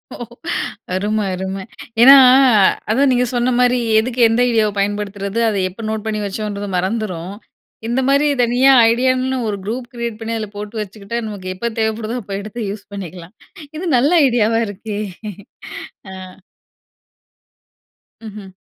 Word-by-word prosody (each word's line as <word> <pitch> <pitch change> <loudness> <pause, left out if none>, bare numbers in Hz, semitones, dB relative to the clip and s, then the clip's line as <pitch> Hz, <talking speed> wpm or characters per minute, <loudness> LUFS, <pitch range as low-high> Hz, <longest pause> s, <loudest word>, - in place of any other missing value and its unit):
ஓ! - - -10 0.8
அருமை, 210 +3 -1
அருமை 190 +1 -4 0.4
ஏன்னா, 270 +3 +10 0.7
அதான் 270 +4 +3
நீங்க 250 0 +2
சொன்ன 245 +1 +1
மாரி, 250 0 +3 0.2
எதுக்கு 245 +2 -4
எந்த 225 +2 +1
ஐடியாவை 220 -3 +1
பயன்படுத்துறது, 200 +1 -2
அதை 205 -3 -1
எப்போ 190 +5 -11
நோட் 220 0 -4
பண்ணி 215 -1 -2
வச்சோன்றது 205 0 -4
மறந்துரும். 190 -2 -3 0.5
இந்த 240 +3 0
மாதிரி, 280 +2 +3 0.2
தனியா 245 +3 +4 0.2
ஐடியான்னு 255 +2 +1
ஒரு 205 - -2
குரூப் 240 +3 -5
கிரியேட் 235 -2 -4
பண்ணி, 225 +1 -4
அதில 215 -2 -5
போட்டு 210 +2 -6
வச்சுக்கிட்டா, 210 +2 -6
நமக்கு 185 -3 -6
எப்போ 235 +5 -3
தேவைப்படுதோ, 220 +2 -2
அப்ப 195 0 -7
எடுத்து 215 0 -6
யூஸ் 205 0 -9
பண்ணிக்கலாம். 180 0 -9 0.4
இது 365 - -5
நல்ல 265 +5 +3 0.2
ஐடியாவா 225 -2 +1
இருக்கே! 205 +1 -6 1.1
அ. - - -8 2.1
ம்ஹ்ம். 210 -2 -9
215 Hz, 135 wpm, -18 LUFS, 200-240 Hz, 2.1 s, ஏன்னா